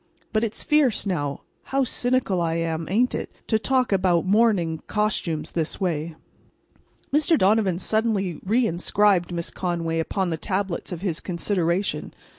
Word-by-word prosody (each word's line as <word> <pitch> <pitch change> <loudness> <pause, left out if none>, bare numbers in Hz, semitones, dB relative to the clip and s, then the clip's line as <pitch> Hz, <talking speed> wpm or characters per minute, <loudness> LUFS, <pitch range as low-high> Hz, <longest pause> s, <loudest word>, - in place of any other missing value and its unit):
But 215 +1 +2
it's 225 -2 -3
fierce, 285 -9 +2
now, 145 -7 -2 0.2
how 270 0 +1
cynical 245 -7 +1
I 165 -1 0
am, 165 -1 -2
ain't 235 +7 +2
it?—to 220 - -2
talk 255 +1 +1
about 185 -3 +2
mourning 195 -6 +2
costumes 170 -7 -1
this 165 -2 -2
way. 165 -3 -2 1.0
Mr. 310 +2 +4
Donovan 195 -3 +3
suddenly 205 -4 0
reinscribed 195 -3 +2
Miss 170 -1 -2
Conway 170 -2 -2
upon 185 +2 -1
the 160 - -1
tablets 190 +1 -3
of 175 -2 -5
his 175 -5 -1
consideration. 180 +1 -1
190 Hz, 135 wpm, -24 LUFS, 170-220 Hz, 1.0 s, Mr